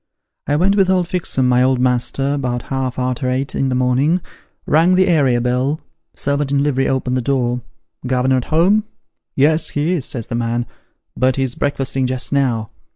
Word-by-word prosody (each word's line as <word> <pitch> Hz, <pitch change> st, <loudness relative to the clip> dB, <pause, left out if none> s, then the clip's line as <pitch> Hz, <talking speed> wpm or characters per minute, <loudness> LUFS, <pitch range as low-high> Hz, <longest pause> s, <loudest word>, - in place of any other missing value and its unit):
I 145 Hz, -, +1 dB
went 190 Hz, +6 st, +2 dB
with 195 Hz, -2 st, +3 dB
old 180 Hz, -2 st, +2 dB
Fixem, 165 Hz, -8 st, 0 dB
my 125 Hz, 0 st, +3 dB
old 130 Hz, 0 st, +2 dB
master, 130 Hz, +3 st, +1 dB
'bout 125 Hz, -3 st, -2 dB
half 130 Hz, -1 st, -2 dB
arter 125 Hz, +1 st, -1 dB
eight 130 Hz, +2 st, -2 dB
in 135 Hz, -, 0 dB
the 125 Hz, -, -1 dB
morning; 130 Hz, +7 st, +2 dB, 0.5 s
rang 165 Hz, +4 st, +3 dB
the 185 Hz, +1 st, +3 dB
area 140 Hz, -8 st, +3 dB
bell; 125 Hz, +5 st, 0 dB, 0.4 s
servant 140 Hz, 0 st, -1 dB
in 140 Hz, 0 st, +2 dB
livery 135 Hz, -2 st, +1 dB
opened 130 Hz, -1 st, 0 dB
the -, -, 0 dB
door: 125 Hz, -1 st, 0 dB, 0.2 s
' 80 Hz, -, -58 dB
Governor 130 Hz, +1 st, +2 dB
at 125 Hz, -, -2 dB
home? 190 Hz, +7 st, +2 dB
' -, -, -56 dB
' -, -, -64 dB
Yes, 155 Hz, +4 st, +3 dB
he 150 Hz, +4 st, -1 dB
is,' 165 Hz, -8 st, -1 dB
says 115 Hz, -4 st, -4 dB
the 115 Hz, -, -7 dB
man; 120 Hz, 0 st, -1 dB, 0.3 s
' -, -, -52 dB
but 130 Hz, 0 st, +2 dB
he's 130 Hz, -2 st, -1 dB
breakfasting 135 Hz, -2 st, -1 dB
just 130 Hz, +2 st, -2 dB
now.' 120 Hz, -6 st, 0 dB
130 Hz, 200 wpm, -18 LUFS, 125-145 Hz, 0.5 s, with